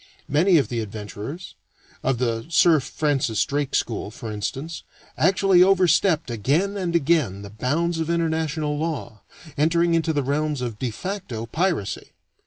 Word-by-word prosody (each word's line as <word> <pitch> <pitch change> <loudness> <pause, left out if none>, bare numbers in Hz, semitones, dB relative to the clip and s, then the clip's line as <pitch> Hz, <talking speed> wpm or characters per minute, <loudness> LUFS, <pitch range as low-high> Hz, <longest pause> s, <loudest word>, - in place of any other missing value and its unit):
Many 170 +5 +4
of 145 - +1
the 120 - -2
adventurers 110 - -7 0.5
of 130 -1 0
the 115 0 -1
Sir 165 -1 +5
Francis 130 -6 0
Drake 140 +1 -2
school, 110 -3 -1
for 110 +1 -7
instance 135 +10 -4 0.3
actually 190 +1 +4
overstepped 180 -5 +3
again 150 - 0
and 180 -4 -2
again 140 - +1
the 100 - -9
bounds 160 +10 -1
of 160 0 -2
international 160 -3 -1
law, 155 -9 -4 0.4
entering 170 +2 +3
into 165 -1 +2
the 145 -3 0
realms 145 +1 -1
of 115 -4 -4
de 130 - -1
facto 155 - -5
piracy. 160 - -2
150 Hz, 145 wpm, -23 LUFS, 120-170 Hz, 0.5 s, Sir